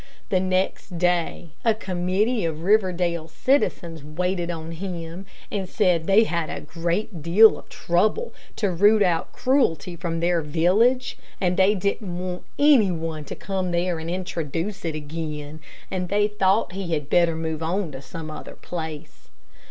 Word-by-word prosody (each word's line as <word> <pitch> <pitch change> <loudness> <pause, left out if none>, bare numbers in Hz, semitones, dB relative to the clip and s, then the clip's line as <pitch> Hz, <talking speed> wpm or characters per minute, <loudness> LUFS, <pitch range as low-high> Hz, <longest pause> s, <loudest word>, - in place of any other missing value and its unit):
The 185 - +3
next 185 -1 -1
day 175 -1 0
a 225 -2 +3
committee 195 +4 0
of 160 -1 -3
Riverdale 180 -5 +2
citizens 170 - 0
waited 175 +3 -2
on 165 -1 -5
him, 175 +1 -6 0.2
and 195 -3 -3
said 180 -6 +2
they 200 +3 +6
had 170 -6 -1
had - - -4
a - - -7
great 170 +3 -2
deal 195 +8 +7
of - - -17
trouble 215 - 0 0.2
to 205 -4 0
root 205 +4 +5
out 170 -3 0
cruelty 210 - +1
from 165 -1 -3
their 170 0 +2
village, 190 - +2 0.2
and 180 -1 +1
they 195 +3 +4
didn't 195 -1 -2
want 180 0 -4
any 285 -9 +6
one 160 -3 -4
to - - -6
come 190 -2 -3
there 175 -1 0
and 160 +1 -5
introduce 175 +1 -3
it 160 -2 -2
again, 150 0 -5 0.3
and 180 -1 -2
they 205 +1 +3
thought 205 -1 +1
he 185 -2 -4
had 150 -3 -2
better 170 0 +3
move 160 -1 -3
on 170 +1 -1
to 135 -1 -8
some 155 +2 -7
other - - -8
place. 160 -4 -7
175 Hz, 160 wpm, -24 LUFS, 165-195 Hz, 0.3 s, deal